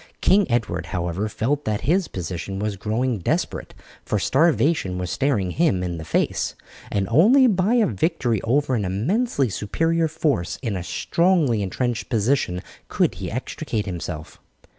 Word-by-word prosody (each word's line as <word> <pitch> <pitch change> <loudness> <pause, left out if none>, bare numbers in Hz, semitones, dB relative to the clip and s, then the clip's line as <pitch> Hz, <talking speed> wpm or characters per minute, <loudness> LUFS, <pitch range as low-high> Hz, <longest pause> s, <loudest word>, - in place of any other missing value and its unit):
King 195 -2 +3
Edward, 95 -9 -1
however, 90 +5 -2
felt 140 +8 -1
that 105 -1 -1
his 175 +7 +1
position 90 +2 -5
was 105 0 -2
growing 110 +4 -1
desperate, 85 - -2 0.3
for 105 - -1
starvation 145 - +2
was 90 -2 -3
staring 120 -10 0
him 100 - +1
in 85 -2 -3
the - - -6
face, - - 0 0.4
and 100 -1 0
only 220 - +6
by 205 0 +2
a 235 -3 +4
victory 120 - 0
over 135 +3 +1
an 110 -4 +1
immensely 135 - 0
superior 165 - 0
force 150 - -1
in 110 -5 -1
a 90 - -3
strongly 145 - +1
entrenched 120 +5 -2
position 110 -6 0 0.2
could - - +1
he - - -3
extricate 105 -2 -3
himself. 85 -4 -6
115 Hz, 150 wpm, -23 LUFS, -, 0.4 s, only